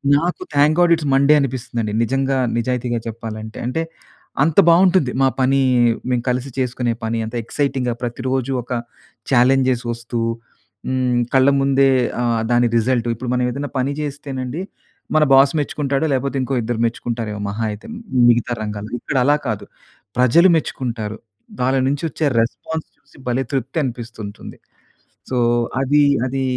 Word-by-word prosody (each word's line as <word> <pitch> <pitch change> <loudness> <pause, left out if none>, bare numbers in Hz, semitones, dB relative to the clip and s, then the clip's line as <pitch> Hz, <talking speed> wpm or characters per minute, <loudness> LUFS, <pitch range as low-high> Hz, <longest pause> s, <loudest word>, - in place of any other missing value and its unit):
నాకు 170 +5 -1
thank 145 +2 +4
God 175 -1 +4
it's 160 -3 -4
Monday 140 +2 +5
అనిపిస్తుందండి. 120 -5 -2
నిజంగా 135 +3 0 0.2
నిజాయితీగా 120 0 -1
చెప్పాలంటే. 110 -1 -7
అంటే, 145 +6 -1 0.6
అంత 155 0 0
బాగుంటుంది 175 -5 +4
మా 135 - +5
పని, 135 +1 +3 0.5
మేము 125 -2 0
కలిసి 125 +2 -1
చేసుకునే 125 -2 -1
పని 115 +1 -1
అంత 110 +2 -7
ఎక్సైటింగ్‌గా 130 0 -1
ప్రతిరోజు 130 +2 -2
ఒక 120 - -15 0.6
చాలెంజ్స్ 130 0 +3
వస్తూ 115 0 -4 0.7
హ్మ్, 130 -1 +1
కళ్ళ 135 +1 +5
ముందే 135 0 +3 0.3
ఆహ్, 115 -2 +1
దాని 120 0 +4
రిజల్ట్ 120 +1 +1
ఇప్పుడు 120 +2 -4
మనం 125 0 +1
ఏదైనా 140 +3 -4
పని 130 +2 0
చేస్తేనండి. 140 0 -5 0.5
మన 155 - +5
బాస్ 135 +1 +6
మెచ్చుకుంటాడు, 140 0 -1
లేకపోతే 135 +1 -1
ఇంకో 135 - -3
ఇద్దరు 115 0 -2
మెచ్చుకుంటారేమో 115 -2 -3
మహా 105 +3 -3
అయితే 105 +1 -9 0.4
మిగతా 120 0 +2
రంగాలలో. 105 +1 -5
ఇక్కడలా 135 +3 +2
కాదు 105 -2 -3 0.5
ప్రజలు 145 +9 +5
మెచ్చుకుంటారు. 115 -8 -4 0.4
వాళ్ళ 130 +2 +2
నుంచి 140 +2 -2
వచ్చే 155 +2 -2 0.2
రెస్పాన్స్ 160 +7 -4
చూసి - - -24
భలే 125 +2 0
తృప్తి 135 +2 -2
అనిపిస్తూ 120 -2 -7
ఉంటుంది. 100 - -10 0.7
సో, 130 - -1 0.4
అది, 145 +2 +3 0.2
అది 135 +1 -2
130 Hz, 140 wpm, -20 LUFS, 120-135 Hz, 0.7 s, బాస్